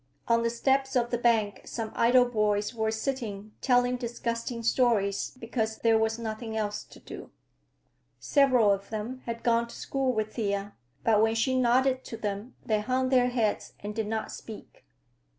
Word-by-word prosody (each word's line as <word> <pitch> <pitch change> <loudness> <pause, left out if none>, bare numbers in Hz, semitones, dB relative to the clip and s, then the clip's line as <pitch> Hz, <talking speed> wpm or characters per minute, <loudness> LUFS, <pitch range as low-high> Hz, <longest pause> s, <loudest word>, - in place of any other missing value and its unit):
On 230 0 +3
the 230 - +1
steps 270 +3 +1
of 240 -1 +1
the 240 - +1
bank 220 -4 +2
some 225 -2 -5
idle 245 +2 +5
boys 210 -2 0
were 220 -1 0
sitting, 220 -3 -3
telling 245 -1 +3
disgusting 235 -1 -4
stories 225 -3 +1
because 225 -1 -2
there 225 -1 +3
was 220 0 +1
nothing 220 0 -5
else 210 -1 -2
to - - -15
do. - - -10 0.9
Several 255 -7 +4
of 200 0 -2
them 225 +4 -5
had 230 0 -4
gone 235 0 +2
to 235 - -11
school 270 -1 -1
with 215 -2 -2
Thea, 200 -2 -2 0.3
but 215 -2 +4
when 225 0 +3
she 260 +3 +1
nodded 255 +1 +3
to 230 - -7
them 205 +3 -4
they 215 -3 +1
hung 255 +4 0
their 250 -1 +4
heads 230 -4 -1
and 205 +1 -5
did 220 -1 -2
not 220 0 -3
speak. 220 -2 -11
230 Hz, 170 wpm, -28 LUFS, 215-245 Hz, 0.9 s, idle